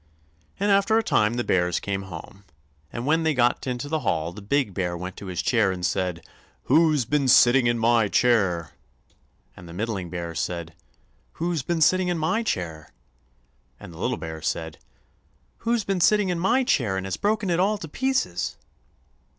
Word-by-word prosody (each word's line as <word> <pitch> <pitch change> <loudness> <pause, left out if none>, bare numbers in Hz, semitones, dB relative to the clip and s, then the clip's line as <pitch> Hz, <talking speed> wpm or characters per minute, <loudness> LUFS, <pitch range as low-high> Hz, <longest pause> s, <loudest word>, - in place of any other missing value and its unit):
And 205 +1 +2
after 200 +3 +3
a 225 - +2
time 110 - +2
the 120 - -1
bears 90 -4 +1
came 100 -1 -3
home, 95 +1 -10 0.5
and 120 +1 -5
when 160 +3 +2
they 160 -2 +1
got 120 +1 +1
into 125 +2 -3
the 160 +1 -1
hall 85 - -1
the 105 - -10
big 105 0 0
bear 90 -1 -2
went 90 +1 -6
to 100 - -8
his 90 -2 -3
chair 110 -6 +2
and 90 -1 -3
said: 90 -2 -2 0.4
"WHO'S 155 -2 +3
BEEN 140 +2 0
SITTING 125 0 +6
IN 120 0 +1
MY 115 -1 +3
CHAIR?" 95 -9 +1 0.8
and 90 -1 -12
the - - -9
middling 100 -2 -3
bear 85 -1 -5
said: 85 0 -4 0.6
"WHO'S 170 -2 -2
BEEN 165 +4 -2
SITTING 185 +3 +4
IN 175 -1 0
MY 160 +8 0
CHAIR?" 80 - -4 0.9
and 85 - -11
the 80 - -12
little 125 +6 -1
bear 80 -1 -7
said: 80 -1 -3 0.9
"_Who's 230 -1 +1
been 195 -2 -1
sitting 210 +1 +3
in 175 -1 -1
my 235 +9 +2
chair 110 - +1
and 95 - -4
has 95 - -2
broken 210 -2 0
it 170 - +1
all 205 +3 +2
to 165 - -8
pieces? 265 - -1
120 Hz, 185 wpm, -24 LUFS, -, 0.9 s, SITTING